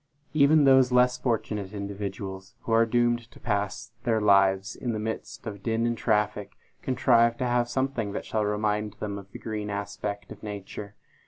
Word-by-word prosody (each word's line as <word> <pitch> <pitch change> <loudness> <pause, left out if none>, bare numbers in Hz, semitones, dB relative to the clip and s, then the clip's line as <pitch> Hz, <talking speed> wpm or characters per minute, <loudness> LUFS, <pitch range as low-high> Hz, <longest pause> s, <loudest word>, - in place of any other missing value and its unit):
Even 150 0 +5
those 130 -2 +6
less 125 0 +4
fortunate 105 -5 -2
individuals, 100 -1 -5
who - - -5
are 115 0 +5
doomed 120 0 +1
to - - -16
pass 100 0 -2
their 115 -2 +2
lives 100 -2 +3
in 120 -2 -3
the 110 - -2
midst 110 +1 -5
of 100 -3 -6
din 115 +1 0
and 120 0 +1
traffic, 105 -2 0 0.3
contrive 120 -2 +3
to 125 - -1
have 120 -1 +1
something 130 -4 -1
that - - -4
shall 110 -1 0
remind 105 0 0
them 105 -1 -5
of 100 0 -14
the - - -8
green 105 -2 -4
aspect 100 0 -4
of - - -10
nature. 105 0 -7
105 Hz, 175 wpm, -27 LUFS, 100-120 Hz, 0.3 s, those